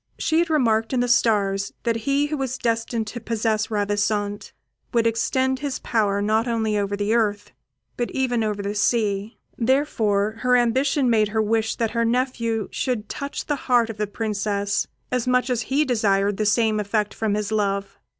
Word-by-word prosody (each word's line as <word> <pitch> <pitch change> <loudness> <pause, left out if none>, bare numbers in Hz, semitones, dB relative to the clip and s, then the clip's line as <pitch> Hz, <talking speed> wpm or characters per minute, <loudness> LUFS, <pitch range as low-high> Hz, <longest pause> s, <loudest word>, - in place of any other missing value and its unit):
She 320 0 +1
had 340 0 +1
remarked 225 -6 +2
in 255 - +2
the 245 - +1
stars 200 -4 +2
that 230 -1 +1
he 280 +1 +3
who 300 +1 -3
was 260 -2 -2
destined 230 -1 -1
to 225 +3 -6
possess 220 -1 -1
Ravissante 205 0 -1 0.4
would 235 -2 +2
extend 260 +3 +1
his 280 -2 -3
power 205 -3 0
not 220 +3 +1
only 220 -2 0
over 205 -1 0
the 205 +2 0
earth, 210 -3 0 0.5
but 240 - -1
even 245 -3 0
over 210 -2 -2
the 200 +1 -2
sea. 210 0 0 0.2
Therefore 225 -5 +1
her 250 0 +3
ambition 260 +3 +2
made 220 -3 +3
her 220 +2 -2
wish 220 +1 0
that 230 -2 -1
her 230 -1 0
nephew 230 -2 0
should 240 -5 -2
touch 280 0 -5
the 295 - 0
heart 235 -2 +4
of 215 - -12
the 210 0 -1
Princess 205 -1 -1 0.2
as 250 -1 -1
much 250 0 +2
as 240 -2 0
he 275 +7 +1
desired 205 -5 +1
the 215 - 0
same 215 0 +2
effect 210 0 -1
from 215 -2 -1
his 210 0 -2
love. 200 -2 -1
225 Hz, 180 wpm, -23 LUFS, 205-245 Hz, 0.5 s, heart